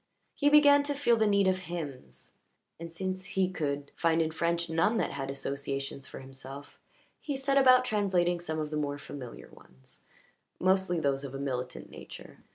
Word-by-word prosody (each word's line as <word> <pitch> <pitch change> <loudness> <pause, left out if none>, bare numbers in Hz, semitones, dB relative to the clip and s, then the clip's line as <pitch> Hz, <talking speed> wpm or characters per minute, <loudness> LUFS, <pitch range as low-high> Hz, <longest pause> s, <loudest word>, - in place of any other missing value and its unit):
He 290 - +2
began 290 -1 +7
to 290 0 -1
feel 275 -4 +3
the 220 -1 +2
need 200 -1 +3
of 185 0 +2
hymns, 145 - -7 0.5
and, 170 0 -7
since 185 +2 -4
he 185 0 0
could 145 -4 -3
find 165 -1 +2
in 160 -1 +1
French 170 +1 0
none 165 +8 +2
that - - 0
had 135 -1 -4
associations 140 0 -4
for - - -9
himself, 135 +1 -11 0.4
he 290 - -4
set 270 +1 0
about 255 -2 +6
translating 185 -6 +1
some 160 -2 -4
of 155 -1 -3
the 150 - -2
more 145 -1 -2
familiar 135 -4 -9
ones, 65 0 -13 0.5
mostly 185 -2 +2
those 140 -2 0
of 135 -1 -6
a - - -5
militant 125 -2 -4
nature. - - -11
165 Hz, 175 wpm, -30 LUFS, 140-195 Hz, 0.5 s, began